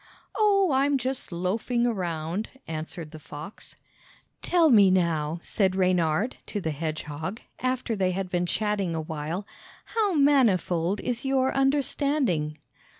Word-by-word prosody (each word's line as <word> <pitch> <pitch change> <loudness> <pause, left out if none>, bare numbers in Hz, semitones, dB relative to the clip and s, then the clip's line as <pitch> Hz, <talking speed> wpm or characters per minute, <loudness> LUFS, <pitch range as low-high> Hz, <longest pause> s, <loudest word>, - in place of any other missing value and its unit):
"Oh, 395 -5 +3
I'm 275 +1 +3
just 260 -3 -4
loafing 215 +8 0
around!" 175 -3 -2 0.2
answered 160 0 -6
the 155 - -9
fox. 150 +6 -10 0.7
"Tell 335 -4 +4
me, 205 -5 +7
now," 170 -3 +1
said 190 -3 +1
Reynard 185 +3 +1
to 210 - -3
the 160 -5 -2
hedgehog, 155 +5 -4 0.2
after 255 -2 -1
they 190 -2 +1
had 185 +1 -2
been 180 -1 -1
chatting 205 -4 -1
a 160 - -1
while, 160 +5 -4 0.4
"how 420 -5 0
manifold 205 - +3
is 245 -1 -3
your 265 -1 +1
understanding?" 270 - +1
195 Hz, 130 wpm, -26 LUFS, 165-260 Hz, 0.7 s, me